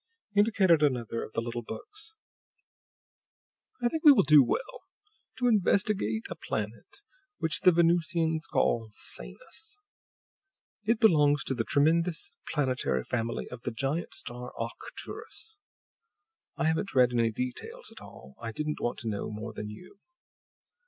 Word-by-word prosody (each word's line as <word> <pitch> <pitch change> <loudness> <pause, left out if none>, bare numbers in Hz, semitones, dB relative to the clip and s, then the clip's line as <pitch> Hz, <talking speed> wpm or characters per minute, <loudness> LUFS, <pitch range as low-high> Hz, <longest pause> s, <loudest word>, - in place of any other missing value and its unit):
He 205 - +3
indicated 195 -6 +4
another 120 -5 0
of - - -9
the - - 0
little 120 0 -4
books. 430 - -9 1.7
"I - - +5
think 315 +6 -2
we 300 - +11
will 275 - +5
do 145 -1 +7
well 315 - -3 0.5
to 245 - +1
investigate 195 - +2
a - - -5
planet 110 - -5 0.3
which 160 -1 0
the 180 - +6
Venusians 165 -1 +2
call 115 -2 +1
'Sanus.' 415 - -7 1.1
It 225 +1 +2
belongs 150 -8 +5
to - - -1
the 120 -3 -1
tremendous 165 +6 +2 0.2
planetary 130 - 0
family 115 - -2
of 125 -1 -8
the - - -2
giant 140 +7 -2
star 125 -5 -6
Arcturus. 435 - -7 1.0
I - - 0
haven't 160 +4 0
read 125 -1 +5
any 115 -1 +3
details 125 +3 -5
at - - -12
all; 65 +2 -13
I 115 -1 -4
didn't 150 +6 -3
want 120 - -1
to 115 - -6
know 105 -2 -2
more 110 +1 -6
than 105 0 -6
you. 180 - -12
145 Hz, 140 wpm, -29 LUFS, 115-180 Hz, 1.7 s, we